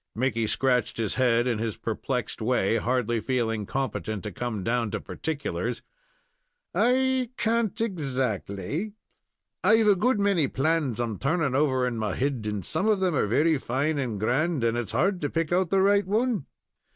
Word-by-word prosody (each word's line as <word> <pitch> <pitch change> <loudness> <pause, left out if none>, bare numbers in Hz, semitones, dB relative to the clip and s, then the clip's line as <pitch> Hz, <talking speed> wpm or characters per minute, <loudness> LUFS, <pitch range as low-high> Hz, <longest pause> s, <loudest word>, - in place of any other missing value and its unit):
Mickey 115 -2 0
scratched 125 +1 +1
his 110 -2 -1
head 120 -2 +2
in 120 -4 0
his 110 -2 -3
perplexed 120 +1 -3
way, 115 -2 +2
hardly 120 0 0
feeling 115 -4 -1
competent 120 -6 -3
to 105 - -5
come 110 0 -4
down 115 +1 0
to - - -3
particulars. 155 -3 -4 0.9
"I 260 0 +2
can't, 230 -2 0
exactly; 140 - -2 0.7
I've 220 +1 +5
a 205 -1 +6
good 220 +4 +2
many 200 -7 +2
plans 140 -4 0
I'm 115 -4 -2
turning 150 -1 0
over 130 -2 +2
in 120 -2 -2
my 105 -3 -1
head, 130 -5 -1
and 100 -4 -4
some 210 - 0
of 215 -3 +3
them 185 -2 +1
are 135 - +1
very 150 +7 +2
fine 140 +5 -1
and 120 -7 -2
grand, 135 - +1
and 115 0 +2
its 120 -5 -2
hard 180 - +1
to 145 - -1
pick 165 +2 -1
out 180 -1 +2
the 195 0 +3
right 200 0 +3
one." 220 - 0
135 Hz, 170 wpm, -26 LUFS, 115-180 Hz, 0.9 s, a